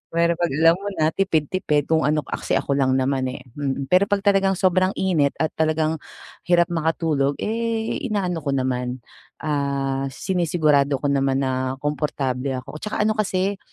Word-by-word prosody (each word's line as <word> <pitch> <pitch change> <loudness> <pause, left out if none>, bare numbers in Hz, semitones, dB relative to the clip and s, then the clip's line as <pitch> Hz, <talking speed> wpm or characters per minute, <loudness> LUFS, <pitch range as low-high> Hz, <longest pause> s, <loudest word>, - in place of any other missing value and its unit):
pero 170 0 +3
pag 175 - +2
alam 165 +4 +3
mo 200 - -6
na 155 0 +2
tipid-tipid 160 -4 0
kung 160 -2 +3
ano 150 0 +1
ah - - -2
kasi - - -1
ako - - -1
lang 135 -2 +2
naman 130 0 0
eh 130 - -6
mm. 135 0 -3
Pero 185 +2 +5
pag 200 0 0
talagang 195 -1 +3
sobrang 185 0 +2
init 160 -7 +1
at 155 +2 -1
talagang 160 0 +1 0.5
hirap 175 -1 +3
makatulog, 160 -4 0
eh 225 0 -2
inaano 195 -8 -2
ko 140 -3 -2
naman 125 -1 -2 0.4
ah 140 -2 -1
sinisigurado 150 -1 +1
ko 145 - +2
naman 135 -1 +1
na 130 0 -1
komportable 140 -3 -1
ako. 130 +4 -7
At - - -37
saka 210 - -4
ano 215 - +2
kasi 195 -1 0
155 Hz, 170 wpm, -22 LUFS, 135-185 Hz, 0.5 s, Pero